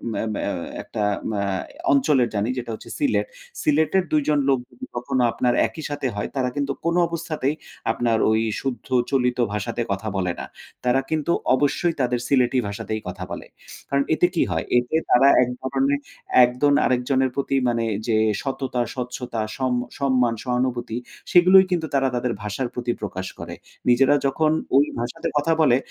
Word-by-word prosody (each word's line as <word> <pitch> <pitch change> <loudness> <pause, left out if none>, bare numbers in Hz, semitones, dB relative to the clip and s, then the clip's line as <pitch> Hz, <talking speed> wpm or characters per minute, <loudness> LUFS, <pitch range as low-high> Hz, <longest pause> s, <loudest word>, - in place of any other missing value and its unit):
অ্যা - - -1 0.3
আ - - -1 0.3
একটা 105 - -4 0.4
আ - - 0 0.5
অঞ্চলের 135 -3 +3
জানি 105 +4 0
যেটা 120 -2 -4
হচ্ছে - - -13
সিলেট। 290 - +1 0.4
সিলেটের 160 +5 +3
২ 155 -1 +3
জন 150 -1 +3
লোক 135 -2 +3
যদি 260 - -9
কখনো 125 +1 -1
আপনার 125 +1 +1
একই 160 - -9
সাথে 145 -2 -2
হয় 105 - -3
তারা 130 -2 0
কিন্তু 140 -1 -1
কোন 170 +1 +1
অবস্থাতেই 155 -3 -2 0.4
আপনার 115 -2 +1
ওই 110 0 +2 0.2
শুদ্ধ 125 -5 -4 0.2
চলিত 125 -2 +1 0.2
ভাষাতে 105 +3 -2
কথা 100 +3 -3
বলে 90 -2 0
না। - - -4 0.4
তারা 130 +2 +3
কিন্তু 160 +1 0 0.2
অবশ্যই 160 +5 +1
তাদের 125 -1 +1
সিলেটি 130 -2 +3
ভাষাতেই 110 +1 -4
কথা 90 0 -5
বলে। - - -6 0.4
কারণ 140 0 +2
এতে 175 - +3
কি - - +3
হয়? 80 - -1
এতে 125 +5 0 0.2
তারা 135 +3 +6 0.2
এক 125 - -2
ধরনের 135 +2 0 0.5
একজন 125 +4 +1
আরেকজনের 130 +1 +1
প্রতি 140 0 -1
মানে 115 -1 0 0.2
যে, 110 -1 +2 0.2
সততা, 135 -2 -2
স্বচ্ছতা, 125 -2 -4 0.2
সম 130 -1 0 0.3
সম্মান, 130 -4 +2
সহানুভূতি 125 -2 -1 0.3
সেগুলোই 185 +2 +7
কিন্তু 165 -3 0
তারা 135 -1 +3
তাদের 120 -1 -1
ভাষার 105 +5 -2
প্রতি 120 -1 -2
প্রকাশ 95 -2 -4
করে। - - -6 0.3
নিজেরা 135 +4 +5
যখন 155 +3 +2 0.3
ওই 145 - +6
ভাষাতে 120 +1 -3
কথা 165 +3 +2
বলে 130 -5 +5
130 Hz, 165 wpm, -23 LUFS, 120-145 Hz, 0.5 s, সেগুলোই